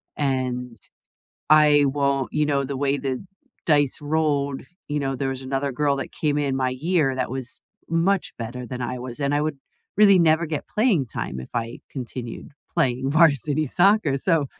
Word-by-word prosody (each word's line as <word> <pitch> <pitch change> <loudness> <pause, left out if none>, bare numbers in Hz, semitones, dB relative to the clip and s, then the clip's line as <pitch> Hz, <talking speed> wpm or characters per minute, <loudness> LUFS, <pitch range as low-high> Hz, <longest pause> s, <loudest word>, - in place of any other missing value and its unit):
and 125 -3 -2 0.8
I 150 -1 +6
won't" 140 -1 0
You 150 0 +1
know, 140 -2 +1
the 135 0 -4
way 140 0 +1
the 130 +1 -3 0.4
dice 145 -4 +3
rolled, 145 -2 0 0.3
you 150 0 -1
know, 135 -1 -1
there 135 +1 -2
was 135 0 -4
another 135 +1 -2
girl 140 +2 +1
that 135 - -5
came 150 -2 0
in 140 -2 0
my 130 -1 0
year 150 +1 +1
that 130 -2 -2
was 130 -2 -4 0.3
much 175 +3 +1
better 120 +2 -5
than 125 +1 -6
I 125 +1 -3
was, 125 0 -7
and 140 0 +1
I 145 - +2
would 150 -2 -2 0.4
really 200 -2 +7
never 165 0 +3
get 155 -2 -4
playing 210 - +2
time 65 - -5
if 65 - -10
I 115 0 -3
continued 125 -2 -6 0.3
playing 130 +1 +1
varsity 155 -1 +3
soccer, 180 -1 +3
so 160 0 +1
140 Hz, 175 wpm, -23 LUFS, 130-155 Hz, 0.8 s, really